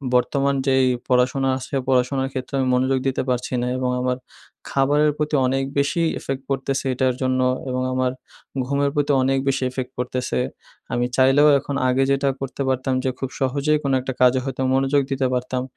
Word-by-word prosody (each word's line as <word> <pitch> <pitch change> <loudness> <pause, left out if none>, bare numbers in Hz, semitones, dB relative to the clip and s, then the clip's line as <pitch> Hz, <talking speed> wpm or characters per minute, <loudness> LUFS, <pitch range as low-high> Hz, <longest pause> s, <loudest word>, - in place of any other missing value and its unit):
বর্তমান 140 +2 +2
যেই 130 -1 +4 0.2
পড়াশোনা 130 +1 +2
আছে, 130 - -10
পড়াশোনার 130 +1 +1
ক্ষেত্রে 130 0 -5
আমি 130 - +1
মনোযোগ 130 +1 +1
দিতে 135 - 0
পারছি 125 0 -1
না। 125 - -1
এবং 130 -1 -1
আমার 125 0 0 0.5
খাবারের 145 +2 +3
প্রতি 150 0 -1
অনেক 135 +1 0 0.2
বেশি 145 +5 +1 0.2
effect 135 0 -4
পড়তেছে 135 0 -1
এটার 130 -1 +1
জন্য 130 0 +1 0.3
এবং 130 0 -1
আমার 130 0 +1 0.5
ঘুমের 140 +1 +1
প্রতি 145 0 +1
অনেক 135 +1 +2
বেশি 135 - 0
effect 130 0 -5
পড়তেছে। 125 - -2 0.5
আমি 120 0 +1
চাইলেও 135 +3 +5
এখন 140 0 -5
আগে 130 +1 +2
যেটা 140 0 +2
করতে 135 +1 -5
পারতাম 130 0 0
যে 130 - +1
খুব 135 - -3
সহজেই 140 +3 +1
কোনো 135 -1 +1
একটা 130 +1 -4
কাজে 125 +1 +5
হয়তো 135 -1 -4
মনোযোগ 135 +1 +2
দিতে 135 -1 +1
পারতাম। 125 0 -2
130 Hz, 175 wpm, -22 LUFS, 130-140 Hz, 0.5 s, চাইলেও